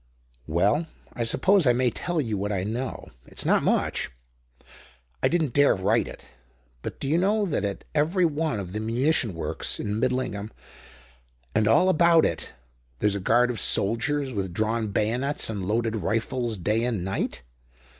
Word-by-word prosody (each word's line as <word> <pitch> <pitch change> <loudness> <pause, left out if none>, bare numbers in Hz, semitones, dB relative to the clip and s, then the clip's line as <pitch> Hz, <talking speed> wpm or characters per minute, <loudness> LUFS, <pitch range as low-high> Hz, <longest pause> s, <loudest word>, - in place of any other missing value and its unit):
"Well, 100 - +2 0.3
I 120 - -2
suppose 185 - +3
I 125 - +6
may 125 0 +2
tell 175 +5 -2
you 115 -7 -1
what 100 +1 -2
I 95 -2 -1
know. 120 +5 -4 0.2
It's - - -5
not - - +3
much. - - 0 1.1
I - - +4
didn't 160 -7 0
dare 145 0 +5
write - - +1
it. - - -12 0.5
But - - -6
do - - -3
you 160 +4 +2
know 205 +3 +2
that 150 - -1
at 100 -1 -3
every 165 +5 +2
one 155 -6 -1
of 90 -2 -6
the 105 - -2
munition 115 - +1
works 80 - -3
in 105 +1 -2
Midlingham 125 -5 -1 1.0
and 110 -1 +2
all 115 +12 +5
about 170 -2 +5
it 80 - -3 0.4
there's 105 +9 +1
a 100 - -2
guard 120 +6 +3
of 115 - -4
soldiers 130 +6 +1
with 95 -4 -3
drawn 110 +1 0
bayonets 115 +6 -1
and 100 -4 -4
loaded 115 +1 0
rifles 115 +4 -1
day 105 +6 0
and 115 -7 -1
night? 95 -9 -3
115 Hz, 165 wpm, -25 LUFS, 105-145 Hz, 1.1 s, I